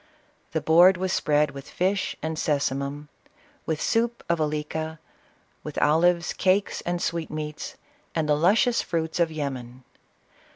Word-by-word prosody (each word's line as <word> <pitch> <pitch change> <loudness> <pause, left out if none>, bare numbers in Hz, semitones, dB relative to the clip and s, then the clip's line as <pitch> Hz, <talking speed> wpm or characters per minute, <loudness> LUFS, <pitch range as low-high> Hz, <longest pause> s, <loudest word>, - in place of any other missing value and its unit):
Tho - - +1
board 175 +4 +6
was 185 0 -1
spread 150 -1 +2
with 140 -1 -10
fish 190 +2 0
and 160 0 -2
scsu 145 -3 0
mum, 140 +2 -5 0.6
with 160 -2 -1
soup 235 +1 0
of 170 -1 +1
alica, 155 +1 -2 0.7
with - - -7
olives, 170 +3 +3
cakes 190 +2 +1
and 175 0 0
sweet 165 -1 -2
meats, 150 0 -5 0.4
and 160 -2 0
the 150 - +4
luscious 205 +9 +3
fruits 165 -1 -2
of 170 -2 +2
Yemen. 130 -5 -5
160 Hz, 140 wpm, -25 LUFS, 150-175 Hz, 0.7 s, board